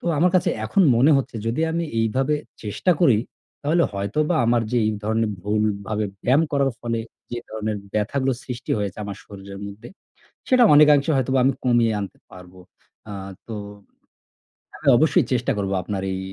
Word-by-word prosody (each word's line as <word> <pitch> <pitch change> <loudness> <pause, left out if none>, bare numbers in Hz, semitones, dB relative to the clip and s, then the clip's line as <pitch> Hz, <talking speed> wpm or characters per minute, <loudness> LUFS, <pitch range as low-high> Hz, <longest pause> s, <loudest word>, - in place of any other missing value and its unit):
তো - - -16
আমার 180 +4 +4
কাছে 180 - +1
এখন 150 - +2
মনে 135 +6 +5
হচ্ছে 135 -3 -2
যদি 115 +6 -1
আমি 170 +1 -1 0.2
এইভাবে 130 +7 +1 0.3
চেষ্টা 110 - 0
করি 130 -11 +5 0.4
তাহলে 160 +4 +2
হয়তোবা 115 - -1
আমার 120 0 +3
যে - - +2
এই 110 - +1
ধরনের 110 0 0
ভুলভাবে 105 +1 -1 0.2
ব্যায়াম 135 +6 +4
করার 140 -1 +2
ফলে 115 -1 -2 0.3
যে 120 - -3
ধরনের 110 -1 -3 0.2
ব্যথাগুলো 130 +6 0
সৃষ্টি 125 -1 -7
হয়েছে 100 -2 -4
আমার 100 -1 -6
শরীরের 100 -1 -10
মধ্যে 100 +4 -10 0.6
সেটা 255 -1 +5
অনেকাংশে 150 0 +6
হয়তোবা 130 0 +1
আমি 135 +2 +3
কমিয়ে 120 -2 +3
আনতে 100 - -7
পারব। 90 -1 -13 0.6
আ - - -6 0.4
তো 115 - -5 1.2
হ্যাঁ, 140 - +1
অবশ্যই 155 +3 +3
চেষ্টা 125 +2 0
করব 100 -1 -2
আপনার 100 +1 -3
এই 95 - -3
115 Hz, 160 wpm, -22 LUFS, 105-140 Hz, 1.2 s, অনেকাংশে